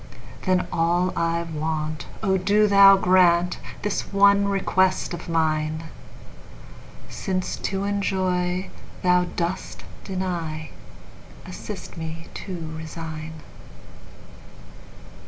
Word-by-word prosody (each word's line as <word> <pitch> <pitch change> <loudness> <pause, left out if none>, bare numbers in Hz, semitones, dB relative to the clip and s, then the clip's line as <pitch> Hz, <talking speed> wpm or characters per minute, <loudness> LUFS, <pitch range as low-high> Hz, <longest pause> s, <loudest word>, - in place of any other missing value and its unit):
Then 185 -1 +3
all 175 +2 +2
I 170 0 0
want—O 155 +3 -2
do 200 +3 +3
Thou 200 -1 +8
grantThis 180 +2 +2
one 200 0 +5
request 190 -2 +1
of 175 0 -7
mine!—Since 160 - -4
to 195 0 -2
enjoy 185 -2 -1 0.3
Thou 180 0 +4
dost 175 +1 -3 0.2
deny, 170 -5 -4 0.7
Assist - - -8
me 165 0 -6
to 170 -5 -6
resign. 160 -1 -7
180 Hz, 80 wpm, -24 LUFS, 160-190 Hz, 0.7 s, Thou